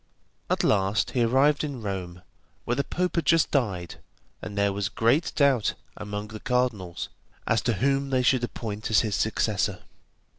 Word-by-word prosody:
At - - +1
last 100 0 +2
he 125 - 0
arrived 135 +6 +3
in 140 -6 -5
Rome, 90 -3 -5 0.4
where 120 - 0
the 140 +3 0
Pope 180 +3 -2
had 165 - +1
just 165 -1 +4
died, 95 - -1 0.4
and 105 -1 -7
there 100 -1 +2
was 100 0 -2
great 120 +10 +2
doubt 140 -6 +3 0.2
among 105 0 -5
the 110 0 -8
cardinals 110 -9 -1 0.4
as 115 - +2
to 120 - +1
whom 135 +5 +1
they 130 -1 +1
should 125 0 +3
appoint 110 -3 -4
as 105 -3 +5
his 110 -2 -2
successor. 105 -2 0
115 Hz, 170 wpm, -26 LUFS, 100-135 Hz, 0.4 s, as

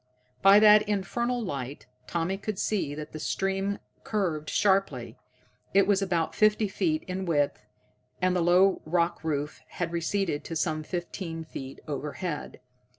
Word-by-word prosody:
By 195 +1 +8
that 210 0 +8
infernal 235 +5 -1
light 140 - -5 0.2
Tommy 170 +3 -1
could 200 +1 -4
see 185 -10 -1
that 150 0 -7
the 155 - -7
stream 195 +4 -1 0.3
curved 170 -8 -1
sharply. 195 -1 +1 0.6
It 195 -1 +6
was 200 0 +3
about 170 -4 0
fifty 215 0 +3
feet 310 - 0
in 185 0 -4
width, 145 -8 +1 0.6
and 185 0 +2
the 180 - +2
low 180 +3 +4
rock 170 +1 0
roof 150 -2 -2
had 170 -2 -4
receded 170 -2 -1
to 165 - -5
some 155 -1 0
fifteen 170 0 -5
feet 135 -4 -8
overhead. 150 +3 -4
180 Hz, 145 wpm, -28 LUFS, 155-200 Hz, 0.6 s, By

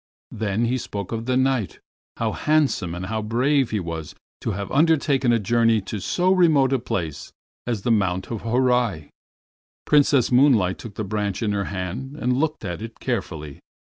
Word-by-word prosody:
Then 110 +1 -1
he 125 +2 0
spoke 100 -4 -6
of 115 +1 -4
the 130 0 +2
Knight, 130 -5 0 0.4
how 115 -1 0
handsome 140 - +1
and 90 +1 -5
how 110 +3 -2
brave 125 +5 +1
he 110 - -1
was 85 -3 -6 0.2
to - - -3
have 100 -1 -4
undertaken 140 -4 +3
a 120 - +4
journey 115 +1 +2
to 105 +2 -5
so 180 - +1
remote 155 -8 +4
a 135 - +2
place 80 -11 -4 0.4
as 115 -5 -2
the 120 - +1
Mount 95 -3 0
of 115 - -4
Horai. 120 - +1 0.8
Princess 145 -4 +4
Moonlight 125 -8 +4
took 110 -4 -9
the 110 - -3
branch 105 0 -2
in 105 - 0
her 100 -1 -1
hand 100 +9 -5
and 125 -4 0
looked 155 -3 -1
at 90 +1 -4
it 115 0 -8
carefully. 80 - -4
115 Hz, 175 wpm, -23 LUFS, 100-130 Hz, 0.8 s, a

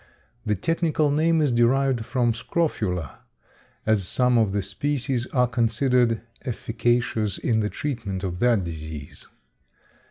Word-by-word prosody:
The 105 - +2
technical 155 - +1
name 160 +2 +3
is 145 - +2
derived 120 0 +2
from 120 -2 +1
scrofula, 110 - -2 0.7
as 110 -4 +2
some 125 -1 +2
of 110 -4 +3
the 100 0 -1
species 130 +4 -2
are 125 -1 +2
considered 120 0 +1 0.2
efficacious 115 -3 -1
in 115 -2 +1
the 105 -1 0
treatment 115 -10 -4
of 90 -2 -3
that 120 -4 +3
disease. 80 -3 -7
120 Hz, 125 wpm, -24 LUFS, 105-130 Hz, 0.7 s, name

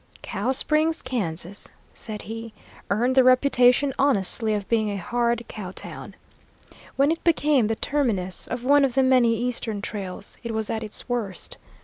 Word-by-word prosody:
"Cow 215 +3 -2
Springs, 310 +4 +1
Kansas," 190 -5 -4 0.3
said 215 -2 -7
he, 225 0 -7 0.4
"earned 235 +6 +1
the 260 0 +6
reputation 255 +1 +4
honestly 220 -4 +2
of 205 -2 -4
being 220 -2 +1
a 200 - -3
hard 235 +4 -1
cow 200 -4 -7
town. 190 - -9 0.8
When 280 +3 +3
it 330 - -3
became 295 -8 +3
the 225 - 0
terminus 220 -11 -1
of 245 0 -4
one 285 +1 +5
of 265 -3 +1
the 265 - +4
many 250 -3 +4
eastern 235 -3 -2
trails, 200 -1 -7
it 230 -1 -4
was 220 -1 -2
at 220 - -2
its 215 - -6
worst. 230 -7 -4
235 Hz, 160 wpm, -24 LUFS, 210-260 Hz, 0.8 s, the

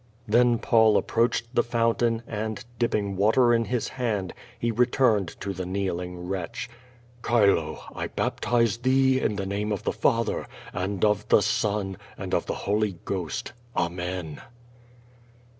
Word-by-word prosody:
Then 120 +2 +4
Paul 110 -2 +4
approached 115 +1 0
the 120 - +4
fountain, 115 0 +1
and, 110 0 -4
dipping 105 -4 0
water 115 +5 +4
in 115 0 +2
his 125 -1 -1
hand, 110 -8 -2 0.2
he 115 +1 0
returned 120 -4 +2
to 100 - -3
the 95 - -4
kneeling 90 -1 -3
wretch. 95 +5 -4 0.6
"Chilo! 100 -9 +2
I - - -3
baptize 115 -2 0
thee, 130 +1 +3
in 105 - 0
the 100 -1 -3
name 100 +2 -2
of 100 - -2
the - - -1
Father, - - 0 0.3
and 95 +1 -1
of 105 -1 +1
the 105 - +5
Son, 100 -2 0 0.2
and - - -6
of - - +1
the - - -2
Holy 105 -2 0
Ghost. 90 - -3 0.2
Amen." 90 -2 -3
105 Hz, 140 wpm, -26 LUFS, 95-120 Hz, 0.6 s, the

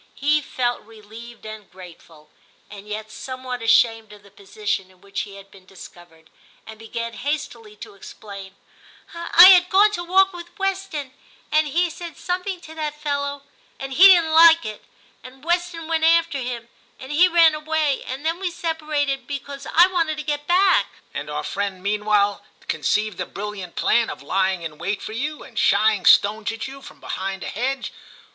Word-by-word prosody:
He 300 +2 +1
felt 245 -3 -2
relieved 225 +2 -13
and 215 -1 -9
grateful, 165 -4 -15 0.4
and 205 0 -11
yet 215 +1 -6
somewhat 255 -1 -7
ashamed 225 -1 +2
of 205 -1 -15
the 200 - -19
position 200 -1 -4
in 185 -1 -24
which 200 +1 -7
he 195 - -12
had 195 0 -14
been 190 -2 -18
discovered, 175 -3 -15 0.3
and 220 -1 -12
began 230 +1 -6
hastily 240 -6 -5
to 205 - -11
explain 200 -1 -11 0.2
— - - -24 0.2
* - - -19
I 340 +2 +7
had 360 -1 +6
gone 410 +2 +5
to 350 -4 -4
walk 380 +2 +3
with 345 +1 -11
Weston, 385 -9 -3 0.4
and 310 0 +3
he 340 +4 0
said 340 +1 -9
something 365 +1 -3
to 320 - -12
that 300 -2 -5
fellow, 285 -1 -3 0.4
and 270 0 -6
he 360 +8 +7
didn't 340 -4 +5
like 330 +1 +7
it, 215 -1 -7 0.4
and 260 +2 -14
Weston 345 -1 -1
went 325 -1 -1
after 330 -3 +3
him, 240 -2 -5 0.3
and 260 +2 -9
he 340 +5 +5
ran 335 -2 +5
away; 305 -2 -1
and 265 +4 -6
then 330 +2 -1
we 380 -2 -2
separated, 305 -6 -3
because 280 -1 -7
I 340 +2 +7
wanted 335 -4 -1
to 305 - -5
get 295 -1 -3
back 370 +2 +3
' - - -27
* - - -35
And - - -6
our - - -4
friend 195 -2 -4
meanwhile 205 0 +1 0.2
conceived 215 -3 -1
the - - -3
brilliant 200 -3 -7
plan 235 -1 +2
of - - -8
lying 190 -2 0
in 155 -2 -8
wait 200 +1 -2
for 215 - -8
you, 290 +6 -4
and - - -7
shy 220 +1 +4
ing 190 - -5
stones 215 +2 +4
at 225 +2 -6
you 275 +1 -11
from - - -14
behind 195 0 -5
a - - -5
hedge. 260 +5 -3
265 Hz, 190 wpm, -22 LUFS, 210-320 Hz, 0.4 s, I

